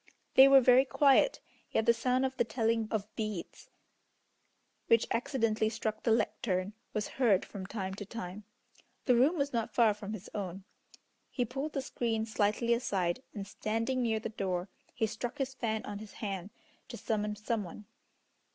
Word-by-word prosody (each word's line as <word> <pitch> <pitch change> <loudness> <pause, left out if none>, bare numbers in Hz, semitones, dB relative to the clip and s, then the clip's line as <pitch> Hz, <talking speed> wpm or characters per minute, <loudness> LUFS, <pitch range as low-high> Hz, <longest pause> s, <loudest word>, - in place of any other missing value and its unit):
They 265 +1 +9
were 275 -1 +8
very 255 +1 +6
quiet, 275 - +4 0.3
yet 220 - +1
the 235 - +6
sound 250 +3 +1
of 260 0 -2
the - - +2
telling 225 -2 0
of 215 -1 -3
beads, 215 -6 -5 1.2
which 230 -1 +5
accidentally 230 -4 +1
struck 220 -1 -3
the 230 - +1
lectern, 210 -3 0 0.2
was 210 -1 -2
heard 205 -7 +4
from 190 -3 -7
time 190 -3 -4
to 205 - -6
time. 205 -2 -6 0.6
The 250 - +5
room 270 +9 +4
was 280 -1 -1
not 230 -2 -2
far 225 -3 +5
from 210 0 -7
his 215 -3 -7
own. 195 -2 -5 0.7
He 245 - -1
pulled 270 +6 -4
the 275 - -2
screen 225 -4 -1
slightly 220 +2 +1
aside, 195 -6 0
and 200 -2 -4
standing 225 +5 -2
near 225 -2 +1
the 225 - -4
door, 190 -3 -2 0.2
he 225 - 0
struck 235 +5 -4
his 270 -2 -2
fan 220 -4 -2
on 205 - -5
his 215 -1 -10
hand, 195 -3 -4 0.4
to - - -8
summon 210 -1 -1
some 215 +1 -2
one. 190 +4 -10
220 Hz, 170 wpm, -32 LUFS, 205-245 Hz, 1.2 s, They